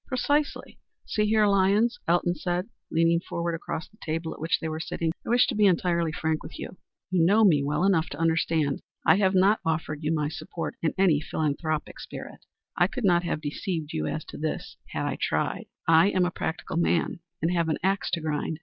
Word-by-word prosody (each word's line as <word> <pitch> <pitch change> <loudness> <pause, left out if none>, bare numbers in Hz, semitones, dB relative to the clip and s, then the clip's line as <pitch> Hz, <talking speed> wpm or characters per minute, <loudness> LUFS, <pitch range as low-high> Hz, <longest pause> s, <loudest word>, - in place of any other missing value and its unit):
"Precisely. 285 +3 -1 0.3
See 210 0 0
here, 215 0 +4
Lyons," 200 +4 +3
Elton 175 +1 +2
said, 175 +3 -2 0.2
leaning 165 +1 +3
forward 170 0 -3
across 165 -1 -4
the 215 - -26
table 160 +1 -3
at - - -13
which 160 +1 +1
they 160 - -3
were 155 0 -3
sitting, 160 0 -2
"I - - -7
wish 245 +1 +5
to - - -2
be 210 -2 +4
entirely 170 -2 +2
frank 160 0 -1
with - - -9
you. 185 - -7 0.3
You 180 -3 +3
know 205 +6 +5
me 160 -9 +5
well 150 +4 0
enough 185 -5 +3
to 145 - -7
understand 160 -3 +1
that - - -28 0.2
I - - +6
have 190 -1 +2
not 195 +4 +4
offered 155 -2 -2
you 155 - 0
my 150 -2 +1
support 165 +2 -5
in 160 - 0
any 175 -6 +4
philanthropic 155 0 -2
spirit. - - -9 0.3
I 175 - +4
could 250 +2 -4
not 175 -2 +4
have 160 - -2
deceived 155 +1 -3
you 75 0 -1
as 155 - -3
to - - -9
this 155 0 -3
had - - -3
I - - -3
tried. - - -1 0.2
I 165 +3 +6
am 185 -2 +2
a 180 - -1
practical 160 -1 -4
man, 170 0 +1 0.2
and 165 +3 0
have 170 -2 +1
an 155 - +1
axe 195 0 +1
to 170 - 0
grind. 155 0 -2
170 Hz, 215 wpm, -27 LUFS, 160-190 Hz, 0.3 s, I